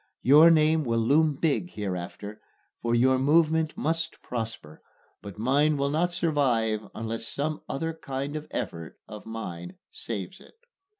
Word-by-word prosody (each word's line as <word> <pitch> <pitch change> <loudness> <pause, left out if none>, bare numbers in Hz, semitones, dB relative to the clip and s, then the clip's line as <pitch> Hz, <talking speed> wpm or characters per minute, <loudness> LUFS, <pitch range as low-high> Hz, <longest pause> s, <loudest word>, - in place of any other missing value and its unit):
Your 150 +6 +8
name 155 -1 +4
will 115 -3 0
loom 145 +6 +3
big 165 +4 0
hereafter, 100 +1 -5 0.4
for 120 0 +1
your 130 +2 +4
movement 160 +2 +2
must 165 +1 -2
prosper, 110 -10 -6 0.4
but 100 -2 -9
mine 145 +6 +2
will 140 0 0
not 170 +4 +1
survive 125 -11 +1
unless 115 +1 -4
some 150 +2 -3
other 165 +4 -2
kind 140 -1 -5
of 155 0 -5
effort 85 -1 -5
of 105 0 -10
mine 90 -6 -6 0.2
saves 100 -6 -6
it. - - -18
135 Hz, 140 wpm, -27 LUFS, 110-155 Hz, 0.4 s, Your